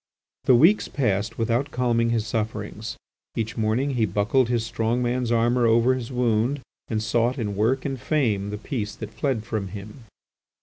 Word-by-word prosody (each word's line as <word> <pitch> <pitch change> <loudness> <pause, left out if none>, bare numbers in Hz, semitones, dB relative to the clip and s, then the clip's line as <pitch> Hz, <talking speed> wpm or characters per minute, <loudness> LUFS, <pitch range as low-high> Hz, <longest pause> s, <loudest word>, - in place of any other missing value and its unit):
The 130 - +6
weeks 165 - +5
passed 105 -6 -1
without 120 +5 0
calming 120 -3 +1
his 115 -2 0
sufferings. 110 -1 -4 0.4
Each 110 0 -2
morning 115 +5 +1
he 115 -4 +1
buckled 105 +6 +2
his 120 -2 0
strong 115 +2 0
man's 120 0 0
armour 120 +1 +3
over 115 +3 +4
his 130 -1 -4
wound 125 +2 +1 0.3
and 110 -1 -1
sought 120 +3 +1
in 105 -5 -2
work 120 +6 +1
and 135 -4 -3
fame 110 -10 0
the 105 - -4
peace 105 -2 -4
that 110 0 -8
fled 130 -7 -1
from 110 -3 -3
him. 105 +5 -9
115 Hz, 170 wpm, -24 LUFS, 110-125 Hz, 0.4 s, The